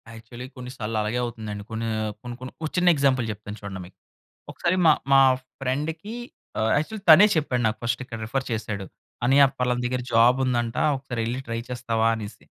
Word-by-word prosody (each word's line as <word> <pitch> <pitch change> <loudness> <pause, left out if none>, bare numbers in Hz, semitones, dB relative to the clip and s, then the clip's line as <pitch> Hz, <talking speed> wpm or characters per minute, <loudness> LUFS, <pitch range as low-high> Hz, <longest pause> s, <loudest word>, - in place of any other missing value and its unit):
Actually 120 +3 -9
కొన్ని 125 -1 -8
సాల్లలాగే 110 +1 -1
అవుతుందండి. 110 -3 -6
కొన్నీ, 115 +1 -3 0.3
కొన్ని 120 -1 -7
కొన్ని 130 - -7
ఓ - - 0
చిన్న 180 0 +5
ఎగ్జాంపుల్ 135 -4 +2
చెప్తాను 105 0 -8
చూడండి 95 -2 -6
మీకు. 90 - -17 0.5
ఒకసారి 175 +1 0
మా, 160 - +8 0.2
మా 135 - +8 0.4
ఫ్రెండ్‌కి, 155 - -3 0.4
ఆహ్, 110 +1 +2
యాక్చువల్ 200 +8 -3
తనే 165 +6 +10
చెప్పాడు 140 -6 0
నాకు, 110 - -2
ఫస్ట్ 115 +2 -1
ఇక్కడ 115 -2 -7
రిఫర్ 130 +4 -2
చేశాడు. 105 -3 -3 0.4
"అన్నయ్య 135 +3 +6
పలాన 125 -1 +1
దగ్గర 125 +1 -1
జాబుందంట. 120 0 +3 0.2
ఒకసారెళ్లి 125 -2 -3
ట్రై 115 0 -2
చేస్తావా?" 115 -2 0
అనేసి. 105 -2 -9
120 Hz, 160 wpm, -25 LUFS, 110-135 Hz, 0.5 s, తనే